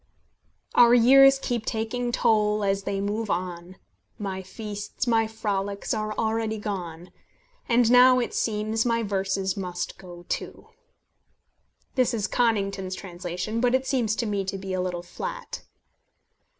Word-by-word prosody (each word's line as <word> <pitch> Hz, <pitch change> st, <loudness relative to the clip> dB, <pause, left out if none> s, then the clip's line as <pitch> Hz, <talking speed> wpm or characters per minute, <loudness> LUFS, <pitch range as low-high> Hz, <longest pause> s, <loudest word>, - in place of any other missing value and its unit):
"Our 240 Hz, 0 st, +7 dB
years 270 Hz, +3 st, +7 dB
keep 245 Hz, -4 st, -2 dB
taking 240 Hz, +3 st, -2 dB
toll 210 Hz, -2 st, +2 dB
as 195 Hz, 0 st, 0 dB
they 200 Hz, -1 st, -2 dB
move 205 Hz, +2 st, -2 dB
on; 180 Hz, 0 st, -4 dB, 0.4 s
My 195 Hz, -3 st, -4 dB
feasts, 205 Hz, +4 st, -6 dB
my 225 Hz, -2 st, +2 dB
frolics, 200 Hz, -2 st, -3 dB
are 215 Hz, 0 st, -2 dB
already 220 Hz, 0 st, -1 dB
gone, 180 Hz, -5 st, -6 dB, 0.6 s
And 235 Hz, 0 st, +4 dB
now, 250 Hz, +1 st, +7 dB
it 245 Hz, -, -1 dB
seems, 220 Hz, 0 st, 0 dB
my 230 Hz, -1 st, +1 dB
verses 195 Hz, -1 st, -1 dB
must 180 Hz, -4 st, -5 dB
go 175 Hz, -2 st, -12 dB
too." -, -, -5 dB, 1.2 s
This 255 Hz, -2 st, +2 dB
is 210 Hz, -3 st, -1 dB
Conington's 200 Hz, -5 st, 0 dB
translation, 185 Hz, +4 st, -4 dB
but 250 Hz, 0 st, +3 dB
it 260 Hz, 0 st, 0 dB
seems 245 Hz, -5 st, 0 dB
to 235 Hz, -, -2 dB
me 205 Hz, -2 st, -1 dB
to 195 Hz, +1 st, -4 dB
be 190 Hz, 0 st, -5 dB
a 185 Hz, -, 0 dB
little 180 Hz, -1 st, -3 dB
flat. -, -, -6 dB
210 Hz, 140 wpm, -25 LUFS, 190-230 Hz, 1.2 s, Our